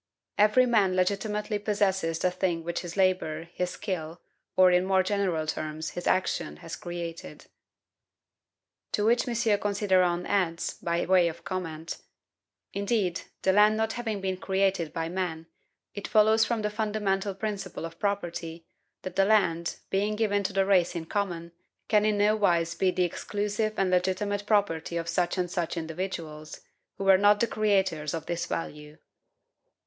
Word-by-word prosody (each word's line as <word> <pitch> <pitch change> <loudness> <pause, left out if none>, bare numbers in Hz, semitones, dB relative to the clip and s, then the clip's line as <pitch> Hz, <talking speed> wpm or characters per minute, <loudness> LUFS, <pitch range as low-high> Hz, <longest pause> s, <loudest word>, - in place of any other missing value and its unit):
"Every 215 +5 +5
man 205 -6 +3
legitimately 210 +3 0
possesses 195 -5 0
the 180 +2 +1
thing 175 -2 -1
which 170 +1 -3
his 175 +1 -7
labor, 185 -4 +1
his 180 0 -1
skill, 175 -5 -5 0.4
or, 185 -1 +6
in 180 0 +4
more 190 0 +3
general 185 -5 0
terms, 155 0 -4
his 175 - -5
action, 185 - 0
has - - -5
created." 170 -1 -7 1.5
To 210 - +1
which 240 +3 +3
M. 230 -3 +1
Considerant 185 -4 +1
adds, 175 -4 0
by 170 0 -2
way 185 -2 +4
of 165 - -6
comment: 165 -4 -5 0.7
"Indeed, 200 -3 0 0.2
the 190 - +3
land 210 +2 +5
not 220 0 0
having 220 -4 -3
been 190 -1 -2
created 190 -4 0
by 165 -1 -3
man, 170 -2 -3 0.5
it 205 - -5
follows 220 +1 +4
from 225 -1 -1
the 210 - -1
fundamental 210 -2 -1
principle 195 -4 -4
of 165 0 -9
property, 170 -5 -3 0.4
that 185 -1 -6
the 195 0 +4
land, 170 -6 +2 0.2
being 205 +2 +1
given 210 -2 +1
to 190 - 0
the 195 0 +2
race 185 -3 +3
in 165 -1 -4
common, 170 -3 -3 0.4
can 210 -1 +3
in 215 -1 +2
no 210 +1 +4
wise 170 -5 +2
be 185 +2 +1
the 180 0 +1
exclusive 210 +4 -2
and 190 -1 +1
legitimate 195 +3 0
property 170 -6 +1
of 165 0 -3
such 175 +2 0
and 180 -1 -1
such 175 -1 -2
individuals, 160 -2 -5 0.4
who - - -4
were 195 -1 +6
not 205 +1 +5
the 235 - +3
creators 190 -9 0
of 160 -1 -5
this 170 0 -3
value." 150 -2 -5
190 Hz, 160 wpm, -28 LUFS, 170-205 Hz, 1.5 s, or